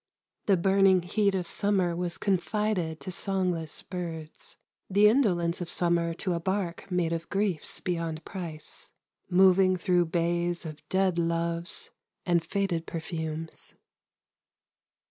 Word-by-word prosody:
The 195 Hz, -2 st, +5 dB
burning 190 Hz, 0 st, +4 dB
heat 200 Hz, +2 st, +1 dB
of 180 Hz, -2 st, -1 dB
summer 190 Hz, -3 st, +1 dB
was 175 Hz, 0 st, -2 dB
confided 195 Hz, -4 st, 0 dB
to 185 Hz, -, -5 dB
songless 180 Hz, -4 st, -2 dB
birds, 165 Hz, -4 st, -7 dB, 0.3 s
the 205 Hz, +2 st, +6 dB
indolence 185 Hz, -8 st, +2 dB
of 175 Hz, -, -4 dB
summer 170 Hz, -1 st, +1 dB
to 180 Hz, +1 st, -1 dB
a 170 Hz, -, -1 dB
barque 190 Hz, 0 st, -2 dB
made 175 Hz, -3 st, +1 dB
of 165 Hz, 0 st, -4 dB
griefs 195 Hz, -6 st, -1 dB
beyond 165 Hz, -3 st, -3 dB
price, 165 Hz, -5 st, -6 dB, 0.4 s
moving 185 Hz, 0 st, +5 dB
through 175 Hz, 0 st, +2 dB
bays 170 Hz, +1 st, 0 dB
of 155 Hz, -1 st, -7 dB
dead 190 Hz, -2 st, +2 dB
loves 170 Hz, +1 st, -1 dB, 0.3 s
and 175 Hz, -2 st, +2 dB
faded 175 Hz, -2 st, -1 dB
perfumes. 160 Hz, -1 st, -5 dB
175 Hz, 125 wpm, -28 LUFS, 165-190 Hz, 0.4 s, the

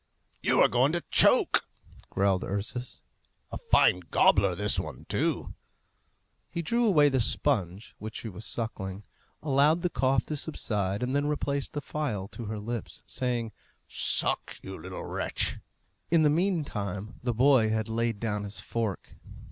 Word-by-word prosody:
"You -, -, +2 dB
are -, -, +7 dB
going 130 Hz, +5 st, +2 dB
to 175 Hz, -, -1 dB
choke!" -, -, +5 dB, 0.4 s
growled 95 Hz, -1 st, +1 dB
Ursus. 110 Hz, +5 st, -4 dB, 0.5 s
"A -, -, -5 dB
fine 90 Hz, -, +4 dB
gobbler -, -, +4 dB
this -, -, +1 dB
one, -, -, -7 dB
too!" -, -, -1 dB, 1.0 s
He 170 Hz, -, -4 dB
drew 235 Hz, +7 st, +2 dB
away 150 Hz, -8 st, +5 dB
the 135 Hz, -2 st, +2 dB
sponge 110 Hz, -5 st, 0 dB
which 110 Hz, +1 st, -7 dB
she -, -, -6 dB
was 105 Hz, +1 st, -8 dB
sucking, 105 Hz, -3 st, -4 dB, 0.4 s
allowed 150 Hz, +3 st, +3 dB
the 180 Hz, -, 0 dB
cough 130 Hz, -2 st, +1 dB
to 150 Hz, -, -4 dB
subside, 105 Hz, -, -2 dB
and 130 Hz, +2 st, -1 dB
then 145 Hz, +1 st, +1 dB
replaced 140 Hz, -2 st, -2 dB
the 145 Hz, -, -3 dB
phial 120 Hz, -12 st, -3 dB
to 120 Hz, -, -8 dB
her 110 Hz, +1 st, -4 dB
lips, 115 Hz, +2 st, -5 dB
saying, 120 Hz, -3 st, -2 dB, 0.4 s
"Suck, -, -, +1 dB
you 95 Hz, -, -7 dB
little 95 Hz, +2 st, -7 dB
wretch!" -, -, -2 dB, 0.5 s
In 165 Hz, -1 st, +4 dB
the 150 Hz, -, +4 dB
meantime 120 Hz, -, -2 dB
the 120 Hz, -2 st, -1 dB
boy 125 Hz, -2 st, +5 dB
had 110 Hz, 0 st, -1 dB
laid 115 Hz, -1 st, -1 dB
down 105 Hz, -2 st, -2 dB
his 100 Hz, +1 st, -6 dB
fork. 115 Hz, -5 st, -4 dB
115 Hz, 155 wpm, -28 LUFS, 105-145 Hz, 1.0 s, are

